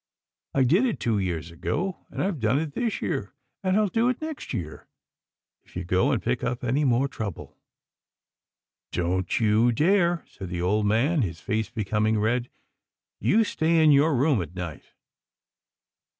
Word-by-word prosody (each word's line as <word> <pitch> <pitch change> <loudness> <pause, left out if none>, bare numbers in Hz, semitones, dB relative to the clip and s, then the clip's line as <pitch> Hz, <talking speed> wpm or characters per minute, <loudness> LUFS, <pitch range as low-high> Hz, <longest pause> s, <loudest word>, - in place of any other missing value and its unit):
I 135 - +4
did 180 - +3
it 230 - -2
two 110 -3 0
years 85 -3 -3
ago, 175 - -3
and - - -8
Tve 190 -5 -1
done 115 +3 +2
it 150 -1 -2
this 230 +3 -2
year, 135 - -3 0.3
and 190 +1 +1
I'll 215 -1 +3
do 225 +5 +1
it 250 - -1
next 315 -2 -6
year, 85 - -5 0.8
if - - -23
you 90 - -3
go 90 +10 +2
and 125 - +1
pick 120 +1 -1
up 125 0 -2
any 130 +5 +1
more 130 0 +2
trouble." 110 -9 -6 0.7
" - - -66
Don't 90 +5 0
you 110 +2 +3
dare," 175 - +2
said 95 -3 -9
the 90 -1 -4
old 105 +4 +1
man, 135 +10 +2
his 85 -7 -3
face 110 +3 -2
becoming 110 0 0
red. 120 +3 0 0.4
" - - -66
You 225 +3 +5
stay 165 -5 +1
in 155 - +6
your 145 +2 +4
room 135 -3 +2
at 85 +1 -7
night." 85 -5 -7
120 Hz, 175 wpm, -26 LUFS, 100-160 Hz, 0.8 s, in